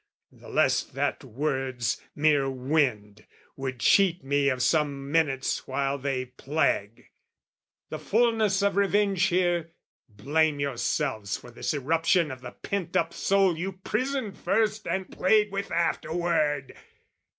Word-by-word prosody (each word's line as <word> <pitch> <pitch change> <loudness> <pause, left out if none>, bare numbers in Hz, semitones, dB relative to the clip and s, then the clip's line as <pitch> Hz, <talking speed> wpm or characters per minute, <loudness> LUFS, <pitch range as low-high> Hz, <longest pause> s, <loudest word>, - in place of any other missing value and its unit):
the - - -15
less - - +3
that - - -3
words, 130 -3 -2
mere 145 -2 +3
wind, 125 -6 -1 0.3
Would 130 -2 -5
cheat 185 +2 +3
me 140 +1 +2
of 130 -1 -1
some 140 -3 0
minutes 145 -5 0
while 140 +1 -1
they 130 -1 -2
plague. 125 -5 -2 0.8
The 155 - -5
fulness 215 +2 +2
of 200 -1 +1
revenge 200 -1 +2
here, 175 -3 0 0.4
blame 145 +8 0
yourselves 130 -5 -1
For 120 - -13
this 120 - -3
eruption 165 +3 +1
of 130 -1 -8
the 125 - -7
pent 200 -4 -3
up 165 0 0
soul 195 -3 +2
You 185 +4 -4
prisoned 220 +4 -3
first 220 -1 0
and 190 -1 -2
played 210 +2 +2
with 200 0 -4
afterward! 165 -4 0
155 Hz, 130 wpm, -27 LUFS, 135-190 Hz, 0.8 s, less